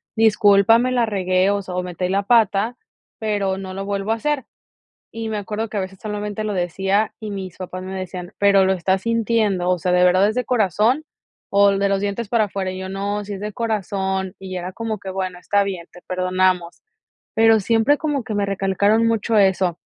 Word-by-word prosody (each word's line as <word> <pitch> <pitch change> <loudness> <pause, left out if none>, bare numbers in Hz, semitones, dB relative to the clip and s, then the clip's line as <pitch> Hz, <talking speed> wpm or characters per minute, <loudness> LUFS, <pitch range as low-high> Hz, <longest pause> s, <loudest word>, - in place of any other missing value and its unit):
discúlpame, 220 +2 +4
la 240 -2 +2
regué, 185 -3 +1
o 205 0 0
sea, 185 -2 -7
o 180 - -1
metí 180 0 -3
la 195 +2 0
pata, 225 +1 +2 0.4
pero 205 -3 -1
no 190 -1 -7
lo 195 +1 -4
vuelvo 200 +1 -2
a - - 0
hacer", 285 +2 -2 0.7
y 225 0 -4
me 215 - -2
acuerdo 215 +2 -3
que 215 - -4
a - - +1
veces 190 0 -7
solamente, 210 0 -4
lo 210 - -2
decía 195 +3 0
y 215 -2 -6
mis 190 -3 -6
papás 185 0 -6
me 190 +1 -6
decían: 185 0 -6
"¿Pero 200 -1 +5
lo 190 - +3
estás 190 +1 0
sintiendo?, 225 -5 +1
o 180 -1 +1
sea, 180 +2 0
¿de 180 0 +4
verdad 185 +2 +4
es 220 - -4
de 250 - -1
corazón 225 - +2 0.5
o 200 0 +6
de 200 0 +1
los 195 -1 +1
dientes 205 +2 -3
para 225 -2 +3
afuera?", 190 -2 -3
y 185 - -6
yo: 190 - -5
"No, 200 +2 -3
sí 205 - -6
es 195 - -7
de 210 0 -4
corazón", 190 -4 -2
y 190 -1 -7
era 180 +1 -5
como 220 -1 -4
que: 195 - -7
"Bueno, 185 -1 -3
está 200 +2 +1
bien, 185 -4 -5
te 175 - -15
perdonamos", 185 -1 0 0.5
pero 225 0 +5
siempre 230 +8 +3
como 295 -4 -2
que 215 - -4
me 205 -1 +1
recalcaron 200 +3 +2
mucho 225 0 +1
eso, 190 -3 +2
200 Hz, 210 wpm, -21 LUFS, 185-220 Hz, 0.7 s, o